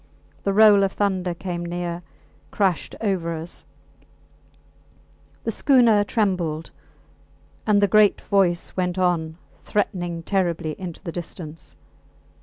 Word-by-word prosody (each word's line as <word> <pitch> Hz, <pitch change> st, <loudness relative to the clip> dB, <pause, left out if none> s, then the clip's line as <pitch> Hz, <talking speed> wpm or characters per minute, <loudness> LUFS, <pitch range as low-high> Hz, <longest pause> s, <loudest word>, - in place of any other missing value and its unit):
The 200 Hz, -, +2 dB
roll 210 Hz, 0 st, +7 dB
of 195 Hz, -, 0 dB
thunder 185 Hz, -3 st, -1 dB
came 175 Hz, -1 st, -4 dB
near, 175 Hz, 0 st, -4 dB, 0.5 s
crashed 190 Hz, -6 st, 0 dB
over 180 Hz, -6 st, -1 dB
us; 165 Hz, +2 st, -7 dB, 1.8 s
the -, -, -1 dB
schooner 235 Hz, -7 st, +4 dB
trembled, 180 Hz, -8 st, -1 dB, 1.0 s
and 205 Hz, -1 st, +4 dB
the -, -, +5 dB
great 210 Hz, +1 st, +4 dB
voice 185 Hz, -4 st, +1 dB
went 180 Hz, -1 st, -1 dB
on, 170 Hz, -3 st, 0 dB, 0.2 s
threatening 175 Hz, -5 st, -2 dB
terribly, 170 Hz, -5 st, -1 dB
into 180 Hz, -2 st, -7 dB
the 170 Hz, -, -4 dB
distance. 165 Hz, -2 st, -8 dB
180 Hz, 110 wpm, -23 LUFS, 170-200 Hz, 1.8 s, roll